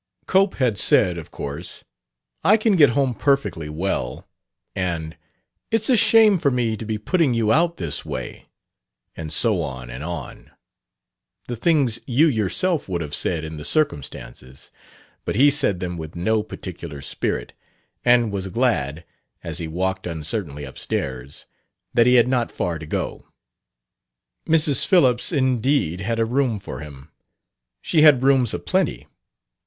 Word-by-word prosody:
Cope 190 Hz, +1 st, +2 dB
had 120 Hz, -7 st, +1 dB
said, 90 Hz, -4 st, +3 dB
of 80 Hz, -, -11 dB
course, 70 Hz, +5 st, -7 dB, 0.6 s
"I 200 Hz, +7 st, +5 dB
can 215 Hz, -2 st, +2 dB
get 150 Hz, -6 st, +6 dB
home 135 Hz, -3 st, +2 dB
perfectly 110 Hz, -, 0 dB
well," 75 Hz, -6 st, -3 dB, 0.5 s
and, 85 Hz, -4 st, -3 dB, 0.5 s
"It's 225 Hz, +2 st, +1 dB
a -, -, +6 dB
shame 215 Hz, -3 st, +5 dB
for 145 Hz, -, +2 dB
me 120 Hz, -4 st, 0 dB
to 110 Hz, -, -7 dB
be 110 Hz, 0 st, -2 dB
putting 135 Hz, -, +1 dB
you 110 Hz, -2 st, +1 dB
out 170 Hz, +4 st, +2 dB
this 85 Hz, -4 st, -4 dB
way," -, -, -7 dB, 0.7 s
and 80 Hz, -2 st, -6 dB
so 105 Hz, +1 st, +2 dB
on 65 Hz, -5 st, -6 dB
and 65 Hz, +4 st, -7 dB
on, 85 Hz, 0 st, -7 dB, 1.0 s
the 120 Hz, -, -4 dB
things 130 Hz, -3 st, +1 dB
you 135 Hz, +6 st, +4 dB
yourself 145 Hz, -, 0 dB
would 85 Hz, -2 st, -2 dB
have 75 Hz, -2 st, -6 dB
said 80 Hz, -3 st, -1 dB
in 80 Hz, 0 st, -7 dB
the 75 Hz, -, -7 dB
circumstances; 65 Hz, -, -3 dB, 0.5 s
but -, -, -3 dB
he 140 Hz, +6 st, +5 dB
said 105 Hz, -10 st, +1 dB
them 90 Hz, -1 st, -4 dB
with 80 Hz, 0 st, -8 dB
no 110 Hz, +6 st, +1 dB
particular 85 Hz, -8 st, -8 dB
spirit, -, -, -3 dB, 0.5 s
and 120 Hz, -3 st, +4 dB
was 95 Hz, -1 st, -3 dB
glad, 85 Hz, -, -1 dB, 0.4 s
as 85 Hz, +1 st, -4 dB
he 85 Hz, -, -4 dB
walked 95 Hz, +3 st, -2 dB
uncertainly 80 Hz, -2 st, -4 dB
up 65 Hz, -, -11 dB
stairs, 65 Hz, 0 st, -4 dB, 0.5 s
that 120 Hz, 0 st, +4 dB
he 125 Hz, -, +5 dB
had 120 Hz, -1 st, +5 dB
not 125 Hz, -2 st, 0 dB
far 85 Hz, -2 st, -3 dB
to 80 Hz, -, -9 dB
go. -, -, -4 dB, 1.2 s
Mrs. 155 Hz, -4 st, +3 dB
Phillips 130 Hz, -9 st, +3 dB
indeed 130 Hz, -, +1 dB
"had 115 Hz, +4 st, -2 dB
a 115 Hz, -, +2 dB
room 125 Hz, -1 st, 0 dB
for 95 Hz, -, -8 dB
him." 70 Hz, 0 st, -11 dB, 0.7 s
She 160 Hz, -, +2 dB
had 145 Hz, -5 st, +6 dB
rooms 130 Hz, -4 st, +3 dB
a -, -, -1 dB
plenty. 65 Hz, -7 st, -1 dB
105 Hz, 155 wpm, -22 LUFS, 80-135 Hz, 1.2 s, get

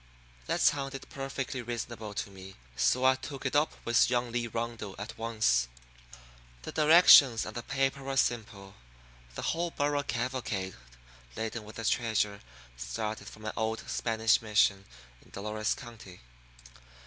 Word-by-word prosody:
That -, -, 0 dB
sounded 135 Hz, -1 st, +1 dB
perfectly 135 Hz, -1 st, -4 dB
reasonable 115 Hz, -2 st, -5 dB
to 100 Hz, -, -4 dB
me, 95 Hz, 0 st, -11 dB, 0.2 s
so 60 Hz, -, +2 dB
I 130 Hz, -, +7 dB
took 135 Hz, +1 st, -8 dB
it 130 Hz, -, -1 dB
up 150 Hz, +2 st, +3 dB
with 120 Hz, 0 st, +4 dB
young 120 Hz, -1 st, 0 dB
Lee 120 Hz, 0 st, -1 dB
Rundle 115 Hz, -3 st, -5 dB
at 110 Hz, +3 st, -7 dB
once. 110 Hz, -, +1 dB, 1.0 s
The -, -, -6 dB
directions 150 Hz, -6 st, +7 dB
on -, -, -7 dB
the 120 Hz, -, -4 dB
paper 135 Hz, +2 st, -1 dB
were 135 Hz, 0 st, -4 dB
simple. 105 Hz, -6 st, -1 dB, 0.6 s
The -, -, -5 dB
whole 170 Hz, +1 st, 0 dB
burro 145 Hz, -2 st, 0 dB
cavalcade 120 Hz, -7 st, -3 dB, 0.6 s
laden 110 Hz, 0 st, -4 dB
with 105 Hz, -, -11 dB
the 115 Hz, -, -5 dB
treasure 110 Hz, -3 st, 0 dB, 0.3 s
started 110 Hz, -, -5 dB
from 110 Hz, 0 st, -13 dB
an 110 Hz, -, -3 dB
old 110 Hz, 0 st, -2 dB
Spanish 115 Hz, -1 st, +2 dB
mission 105 Hz, -2 st, +2 dB, 0.4 s
in -, -, -22 dB
Dolores 105 Hz, +1 st, -2 dB
County. 115 Hz, -7 st, -12 dB
115 Hz, 145 wpm, -30 LUFS, 105-130 Hz, 1.0 s, I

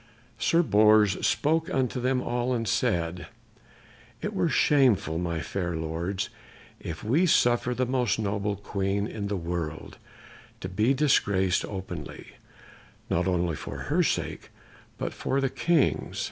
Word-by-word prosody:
Sir 170 Hz, +1 st, +3 dB
Bors 105 Hz, -, +4 dB
spoke 160 Hz, +2 st, +1 dB
unto 130 Hz, -1 st, -1 dB
them 125 Hz, 0 st, +1 dB
all 120 Hz, +1 st, -1 dB
and 115 Hz, -1 st, -2 dB
said, 90 Hz, -8 st, 0 dB, 0.9 s
"It -, -, -4 dB
were -, -, +1 dB
shameful, 110 Hz, -, +3 dB
my 85 Hz, -2 st, -2 dB
fair 85 Hz, 0 st, -3 dB
lords, 80 Hz, +4 st, -3 dB, 0.5 s
if 80 Hz, -, -7 dB
we 145 Hz, +12 st, +2 dB
suffered 120 Hz, -4 st, +2 dB
the 130 Hz, -, +1 dB
most 125 Hz, -2 st, 0 dB
noble 105 Hz, -1 st, -1 dB
Queen 100 Hz, 0 st, -2 dB
in 105 Hz, -2 st, -4 dB
the 100 Hz, -1 st, -2 dB
world 85 Hz, -2 st, -5 dB, 0.6 s
to -, -, -5 dB
be 110 Hz, +8 st, +2 dB
disgraced 100 Hz, -10 st, +2 dB
openly, 95 Hz, -2 st, -7 dB, 0.8 s
not 90 Hz, +2 st, +1 dB
only 90 Hz, -3 st, 0 dB
for -, -, -7 dB, 0.2 s
her -, -, +4 dB
sake, -, -, -2 dB, 0.5 s
but -, -, -3 dB
for 135 Hz, -, -1 dB
the 135 Hz, -1 st, 0 dB
King's." 170 Hz, -5 st, +1 dB
105 Hz, 135 wpm, -27 LUFS, 90-125 Hz, 0.9 s, Bors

